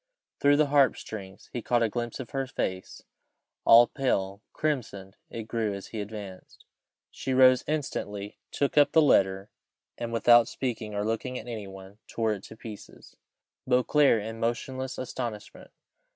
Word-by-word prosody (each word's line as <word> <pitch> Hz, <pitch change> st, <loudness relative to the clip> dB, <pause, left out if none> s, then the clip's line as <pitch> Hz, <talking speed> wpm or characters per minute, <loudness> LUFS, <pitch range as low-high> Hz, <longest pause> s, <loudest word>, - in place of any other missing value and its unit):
Through 145 Hz, 0 st, +4 dB
the 155 Hz, -, +4 dB
harp 140 Hz, -4 st, +5 dB
strings 95 Hz, -3 st, -9 dB
he 120 Hz, -, -3 dB
caught 120 Hz, +1 st, +1 dB
a -, -, +3 dB
glimpse 120 Hz, +3 st, -4 dB
of 130 Hz, -, -7 dB
her 135 Hz, -1 st, -2 dB
face, 95 Hz, -7 st, -4 dB, 0.6 s
all 115 Hz, +1 st, +9 dB
pale 100 Hz, -7 st, -2 dB
crimsoned 110 Hz, -10 st, -3 dB
it 115 Hz, -, -6 dB
grew 110 Hz, -2 st, -2 dB
as 100 Hz, -, -9 dB
he 110 Hz, -, -4 dB
advanced: 100 Hz, -3 st, -9 dB, 0.5 s
she 130 Hz, -, -3 dB
rose 130 Hz, -1 st, +6 dB
instantly, 105 Hz, -9 st, -4 dB
took 145 Hz, +1 st, +1 dB
up 145 Hz, -, +4 dB
the 160 Hz, -, +6 dB
letter, 95 Hz, -7 st, +2 dB, 0.5 s
and, 120 Hz, -1 st, -4 dB
without 120 Hz, 0 st, +5 dB
speaking 115 Hz, -6 st, -4 dB
or 105 Hz, 0 st, -1 dB
looking 115 Hz, +3 st, -2 dB
at -, -, -8 dB
any 110 Hz, -4 st, -6 dB
one, 95 Hz, +2 st, -12 dB
tore 110 Hz, -2 st, -1 dB
it 100 Hz, -, -7 dB
to 110 Hz, -, -12 dB
pieces. 110 Hz, -2 st, -11 dB, 0.5 s
Beauclerc 125 Hz, -2 st, +3 dB
in 110 Hz, +1 st, -6 dB
motionless 130 Hz, +3 st, -3 dB
astonishment. 120 Hz, -4 st, -6 dB
115 Hz, 155 wpm, -27 LUFS, 105-130 Hz, 0.6 s, all